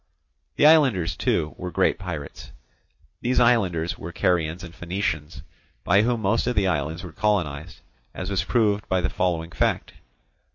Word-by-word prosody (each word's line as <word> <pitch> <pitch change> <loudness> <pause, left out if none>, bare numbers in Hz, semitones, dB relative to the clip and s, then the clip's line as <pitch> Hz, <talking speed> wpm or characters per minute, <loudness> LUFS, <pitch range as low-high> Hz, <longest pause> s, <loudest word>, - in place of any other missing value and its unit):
The - - +3
islanders, 135 - +4
too, 75 0 0
were 90 - -4
great - - +1
pirates. 85 -6 -7 0.7
These 125 +1 +1
islanders 95 -9 +2
were 85 - -7
Carians 85 0 0
and 85 -2 -9
Phoenicians, 85 -3 -4 0.4
by 100 - +4
whom 115 0 0
most 110 +5 +1
of 125 - 0
the 100 - +2
islands 80 -1 -1
were 90 - -8
colonized, 85 -8 -2 0.3
as 95 +1 -6
was 95 - 0
proved 105 -4 +1
by 95 - +2
the 90 - 0
following 85 -2 -1
fact. - - -1
90 Hz, 155 wpm, -24 LUFS, 80-105 Hz, 0.7 s, islanders